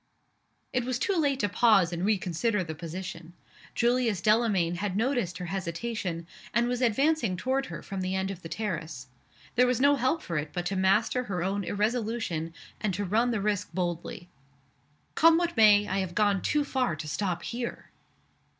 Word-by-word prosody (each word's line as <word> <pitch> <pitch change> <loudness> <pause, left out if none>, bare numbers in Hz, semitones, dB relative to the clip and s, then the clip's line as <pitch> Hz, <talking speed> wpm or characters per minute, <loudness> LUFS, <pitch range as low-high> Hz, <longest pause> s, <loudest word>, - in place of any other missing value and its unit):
It 250 - +1
was 250 0 -1
too 395 +10 0
late 285 -5 +1
to 205 - +2
pause 200 -5 +4
and 170 +1 -3
reconsider 200 +1 0
the 160 -2 -5
position. 170 +1 -7 0.4
Julius 240 -4 +2
Delamayn 205 -5 +2
had 200 0 -2
noticed 230 -7 0
her 180 - -5
hesitation, 180 -1 -3 0.3
and 235 0 +3
was 245 0 -1
advancing 250 - +2
toward 265 +6 -1
her - - -7
from 195 -1 -5
the 185 +1 -1
end 190 +1 -1
of 185 -2 -8
the 165 - -8
terrace. 160 - -4 0.4
There 250 0 +4
was 250 -2 +1
no 285 +2 +5
help 260 +6 0
for 170 -3 -2
it 150 +1 -5
but 175 -1 -3
to 195 - -1
master 210 +6 +2
her 180 -5 -2
own 195 +2 -1
irresolution, 210 -5 -1 0.3
and 195 -4 -1
to 205 +2 -2
run 225 +6 +2
the 225 -4 -1
risk 205 -1 -1
boldly. 175 -1 -3 0.9
"Come 330 0 +6
what 345 0 -1
may, 210 -2 +6
I 190 +1 -1
have 185 -2 -3
gone 205 -2 +2
too 295 0 +1
far 255 - 0
to 155 0 -7
stop 180 +1 -2
_here. 235 0 -4
205 Hz, 180 wpm, -28 LUFS, 180-240 Hz, 0.9 s, Come